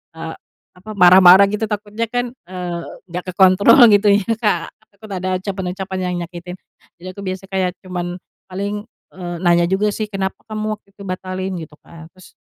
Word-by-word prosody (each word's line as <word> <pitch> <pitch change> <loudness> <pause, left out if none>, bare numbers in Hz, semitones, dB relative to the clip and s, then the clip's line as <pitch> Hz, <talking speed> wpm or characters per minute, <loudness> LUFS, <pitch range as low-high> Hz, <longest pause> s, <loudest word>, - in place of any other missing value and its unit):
eee, 160 0 -7 0.4
apa 215 +4 -10
marah-marah 185 +1 +8
gitu, 210 +1 -1
takutnya 210 +2 -3
kan, 245 0 -2 0.2
eee, 180 -2 -5 0.3
nggak 180 +1 -5
kekontrol 190 +6 +6
gitu 205 +1 +4
ya, 205 - -3
Kak. 200 -7 0
Aku - - -35 0.2
takut - - -12
ada 185 0 -3
ucapan-ucapan 190 -1 -4
yang - - -2
nyakitin, 180 0 -9 0.5
jadi 185 - -9
aku 200 - -8
biasanya 190 +1 -5
kayak 185 -1 0
cuma 180 -1 -4 0.5
paling, 200 +2 -4 0.3
eee, 175 -2 -6
nanya 175 0 +4
juga 195 +3 +1
sih, 215 +1 -3
kenapa 190 -1 -3
kamu 215 -1 -3
waktu - - -56
itu 200 - -11
batalin? 185 +1 -4
Gitu 155 -1 -10
kan, 165 -1 -13
terus 185 - -17
190 Hz, 175 wpm, -19 LUFS, 180-205 Hz, 0.5 s, marah-marah